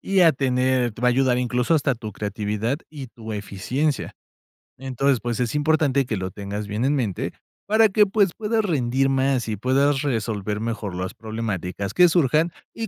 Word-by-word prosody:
Y 195 -1 +1
a 165 -2 +7
tener 130 -2 +1
te 115 - -11
va 125 - +5
a - - +4
ayudar, 125 -1 +2
incluso, 125 +5 +1
hasta 140 -3 +2
tu 110 -3 -7
creatividad 105 +6 -2
y 140 -5 -8
tu 110 -2 -9
eficiencia. 125 +9 -2 0.6
Entonces, 135 0 0
pues, 120 +2 -3
es 120 +1 -1
importante 145 -3 +2
que 110 - -2
lo 95 0 -4
tengas 100 +1 -5
bien 105 +5 -2
en 145 +2 +2
mente 110 -9 -2 0.3
para 220 +1 +5
que, 210 +2 +4
pues, 195 -2 +2
puedas 220 +1 0
rendir 135 - +1
más, 135 -2 +1
y 105 - -2
puedas 135 +4 +2
resolver 110 -6 -2
mejor 110 -5 -3
las 90 0 -4
problemáticas 100 -3 -4
que 180 - +6
surjan, 160 0 +2 0.2
y 225 -1 -4
125 Hz, 180 wpm, -23 LUFS, 110-145 Hz, 0.6 s, a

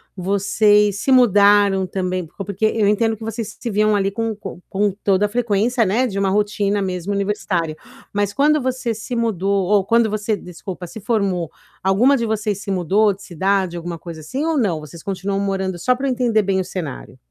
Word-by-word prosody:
vocês 200 +2 +2
se 270 - 0
mudaram 205 -5 +5
também, 185 -1 -2
por 195 +5 -8
porque 200 +2 -1
eu 215 -1 +2
entendo 225 +2 +2
que 225 - -10
vocês 225 -1 -5
se 240 - -4
viam 215 0 +2
ali 195 -1 +1
com 225 +1 -2
com 195 -3 -8
com 205 +1 +1
toda 195 0 +3
a - - -2
frequência, 230 +1 +1
né, 235 +7 +1
de 200 -4 -3
uma 195 -1 +1
rotina 205 0 0
mesmo 185 +1 -3
universitária, 195 -5 -1 0.4
mas 205 0 0
quando 300 +3 +3
você 255 -2 -1
se 225 +3 -6
mudou, 200 -4 0
ou 200 -1 +3
quando 230 0 +3
você, 210 +1 -1
desculpa, 180 0 -8
se 220 - -9
formou, 195 -7 -1 0.3
alguma 225 +9 +4
de 235 - -1
vocês 210 -2 -2
se 210 - -8
mudou 195 +3 +2
de 200 - -14
cidade, 190 0 0
alguma 170 0 -5
coisa 170 -2 -8
assim 260 - -4
ou 325 -1 0
não? 195 - +1
Vocês 155 +2 -11
continuam 195 0 -2
morando 190 -2 -2
só 250 +8 +2
para 270 +2 -3
eu - - +1
entender 240 -3 +2
bem 195 -1 0
o 185 - 0
cenário? 160 - -6
200 Hz, 200 wpm, -20 LUFS, 190-220 Hz, 0.4 s, mudaram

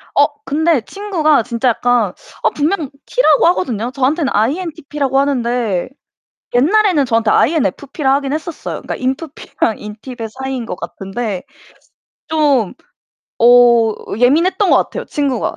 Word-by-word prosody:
어 - - +6 0.2
근데 315 -2 +1
친구가 315 - 0
진짜 235 +3 0
약간 235 -5 +1 0.3
어 - - +4
분명 305 -1 -1 0.2
T - - 0
라고 310 - +4
하거든요. 245 - 0
저한테는 275 +3 0
INTP 295 - -2
라고 270 -1 +2
하는데 240 -7 0 0.7
옛날에는 345 - +3
저한테 230 -2 +1
INFP 285 - 0
라고 270 0 +4
하긴 280 -1 -3
했었어요. 315 +1 -4
그니까 - - -5
인프피랑 265 -4 -3
인팁의 225 +2 -8
사이인 265 -3 -4
것 180 - -5
같은데 195 -1 -5 0.9
좀 290 - +1 0.7
어 240 -2 +6 0.3
예민했던 335 +10 +3
것 - - +6
같아요 - - -2
친구가. 275 -6 -2
265 Hz, 315 characters per minute, -16 LUFS, 235-310 Hz, 0.9 s, 어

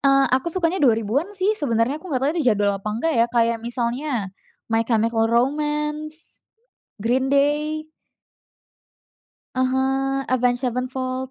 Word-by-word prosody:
Eee, 275 -1 +4
aku 260 +6 +2
sukanya 350 +1 0
2000-an 240 - +2
sih 390 +3 +2
sebenernya 260 - 0
aku 370 - -11
nggak 260 -4 -1
tahu 290 - +3
itu - - -1
jadul 205 0 +1
apa 195 +2 -5
enggak 240 +10 -1
ya, 235 - +4
kayak 230 -1 +1
misalnya 235 -2 -2 0.4
My 225 - +3
Chemical 225 0 +2
Romance, 300 +5 -1 0.6
Green 260 +5 0
Day 300 +2 +1 1.7
Ah 255 - +2
hah, 270 +1 0
Avenged 250 -1 +1
Sevenfold. 255 +1 -3
260 Hz, 135 wpm, -22 LUFS, 235-295 Hz, 1.7 s, Eee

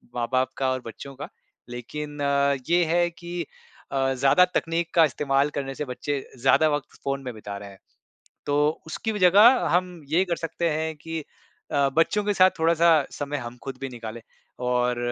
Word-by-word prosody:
माँ-बाप 130 +2 0
का 130 -1 +1
और 130 -1 -2
बच्चों 135 +4 -9
का। 145 +2 -8 0.4
लेकिन 145 +5 -6 0.5
ये 175 +1 +4
है 175 +2 +2
कि 175 +1 -6 0.5
अ, 135 -1 +1
ज़्यादा 135 +8 +5
तकनीक 165 +1 -1
का 165 - +7
इस्तेमाल 140 0 +1
करने 135 -1 -3
से 150 - -4
बच्चे 140 +3 -3 0.2
ज़्यादा 155 +4 +4
वक़्त 145 0 -3
फ़ोन 135 0 -2
में 125 - -5
बिता 105 -2 -7
रहे 100 0 -9
हैं। 95 - -15 0.7
तो 145 - +1 0.3
उसकी 220 +7 -3
भी 210 - -3
जगह 205 +7 +6
हम 180 -2 0
ये 175 +5 +3
कर 175 -2 -2
सकते 165 +1 -2
हैं 160 +1 -2
कि 160 0 -6 0.5
अ, 140 -1 +3
बच्चों 205 +6 +3
के 205 - +1
साथ 185 -1 +6
थोड़ा-सा 170 +1 +4 0.2
समय 145 0 -4
हम 120 0 -7
ख़ुद 135 -1 -5
भी 135 - -3
निकाले। 115 -2 -8 0.5
और 125 0 +1
145 Hz, 180 wpm, -25 LUFS, 130-170 Hz, 0.7 s, का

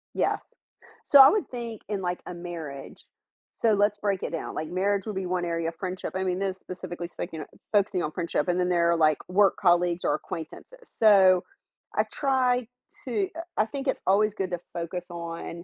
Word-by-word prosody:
Yes. - - +1 0.7
So, 285 - +7
I 270 - +10
would 405 -6 0
think 235 -3 -6
in 205 -2 -2
like 180 -1 -2
a - - -6
marriage 170 -5 -8 0.6
So, 225 -2 +4
let's 205 +1 +2
break 200 -2 -1
it - - -3
down, 165 - -5
like 155 0 -3
marriage 195 +2 0
would 210 - -4
be 190 0 -2
1 180 -1 -1
area 165 -1 -1
of 165 - -11
friendship, 185 -1 -4
I 190 - 0
mean, 185 0 -1
specifically 180 -2 -7
speaking 160 -3 -6 0.3
focusing 200 -3 +2
on 150 - -2
friendship 170 -4 -1
and 180 0 +1
then 180 0 +1
there 170 -1 +3
are 170 - +2
like 155 -2 +4
work 195 +2 +4
colleagues 175 -1 +2
or 145 - +3
acquaintances. 165 - -8
So, 190 -4 +5 0.5
I - - +3
try 255 -3 +1 0.4
to 215 -7 0
uh, - - -3 0.2
I 215 - +4
think 275 +3 -5
it's - - 0
always 210 +2 +4
good 190 -3 -3
to 175 - -2
focus 170 +1 -4
on 170 0 -6
185 Hz, 195 wpm, -27 LUFS, 170-210 Hz, 0.7 s, I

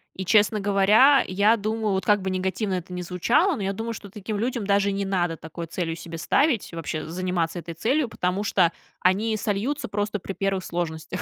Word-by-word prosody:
И, 190 - -5
честно 210 +3 +4
говоря, 205 +8 +5
я 200 +4 +3
думаю, 215 -1 -1
вот 190 - -1
как 205 -1 +3
бы 190 - -2
негативно 190 +2 -1
это 180 0 -4
ни 180 - -4
звучало, 235 - +2
но 210 - -4
я 195 - 0
думаю, 225 +4 -4
что 205 -2 -9
таким 210 +2 -5
людям 235 -2 -2
даже 200 0 +3
не 200 0 -2
надо 175 -4 0
такой 160 +1 -7
целью 165 0 -3
себе 165 0 -8
ставить, 230 - +1
вообще 165 -1 -4
заниматься 175 0 -2
этой 170 0 -7
целью, 250 - 0
потому 180 -1 -1
что 185 -5 +2 0.3
они 215 +4 +2
сольются 240 +7 -2
просто 205 +1 -2
при 195 - -6
первых 195 -1 -1
сложностях. 160 -2 -4
195 Hz, 200 wpm, -25 LUFS, 180-215 Hz, 0.3 s, говоря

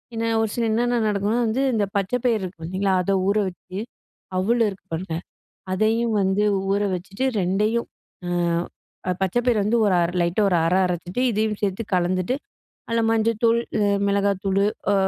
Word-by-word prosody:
என்ன 230 0 0
ஒரு 220 - 0
சில 235 - 0
என்னென்ன 240 +2 +1
நடக்கும்னா 205 +3 0
வந்து 240 +5 0
இந்த 210 -2 +2
பச்ச 195 +2 -1
பயறு 230 -5 +2
இருக்கு 180 -2 -7
பாத்தீங்களா, 190 +3 0
அத 195 - 0 0.2
ஊற 200 - +2
வச்சு, 185 +1 -11 0.6
அவுளு 230 +5 +2
இருக்கு 195 - -11
பாருங்க, 170 0 -3 0.6
அதையும் 220 +3 +1
வந்து 190 +2 +2 0.3
ஊற 200 +1 +1
வச்சுட்டு 195 +7 -4 0.2
2யும் 210 +6 0 0.4
அ, - - -2 0.8
ப - - +2
பச்ச 190 +4 0
பயிர 240 -3 +3
வந்து 215 +4 +2
ஒரு 190 -3 +3 0.3
லைட்டா 170 +5 +1
ஒரு 180 - +2
அர 170 +2 +2
அரச்சுட்டு, 180 +6 -3
இதுயும் 215 0 0
சேத்து 200 +2 -1
கலந்துட்டு 185 +6 0 0.5
அதுல 230 0 +1
மஞ்சள் 225 -1 +1
தூள், 230 0 +5 0.2
அ - - +3 0.3
மிளகாய் 200 -1 +1
தூளு 195 +1 +2 0.3
அ - - +3
200 Hz, 165 wpm, -23 LUFS, 185-225 Hz, 0.8 s, தூள்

